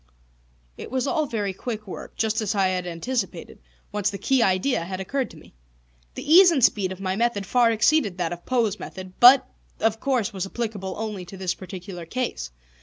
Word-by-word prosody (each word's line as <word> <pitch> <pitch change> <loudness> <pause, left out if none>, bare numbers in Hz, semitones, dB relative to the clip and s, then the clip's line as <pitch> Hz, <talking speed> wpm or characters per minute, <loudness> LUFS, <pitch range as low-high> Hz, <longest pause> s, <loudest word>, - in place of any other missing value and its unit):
It - - -7
was 260 +1 -1
all 310 0 0
very 205 -5 -2
quick 215 +1 -5
work, 190 - -9
just 220 0 0
as 215 0 -1
I 195 -2 +3
had 180 -1 -2
anticipated, 230 +9 -4 0.3
once 205 -1 0
the 200 - -5
key 265 +4 +2
idea 190 +1 +2
had 185 +2 -5
occurred 260 +7 -2
to - - -14
me. - - -17 0.6
The - - -7
ease 355 +4 +8
and 290 -7 +1
speed 195 -4 +3
of 190 - -7
my 190 -1 -2
method 225 -2 0
far 240 +4 +3
exceeded 225 - +2
that 175 -1 -1
of 175 - -10
Poe's 225 -5 0
method, 185 -1 -8
but, 255 +1 +8 0.3
of 225 0 +1
course, 250 -5 0
was 190 -1 -3
applicable 205 -4 -4
only 210 -3 -4
to 195 - -10
this 185 -1 -1
particular 180 -2 -8
case. 240 - -3
210 Hz, 195 wpm, -24 LUFS, 185-245 Hz, 0.6 s, ease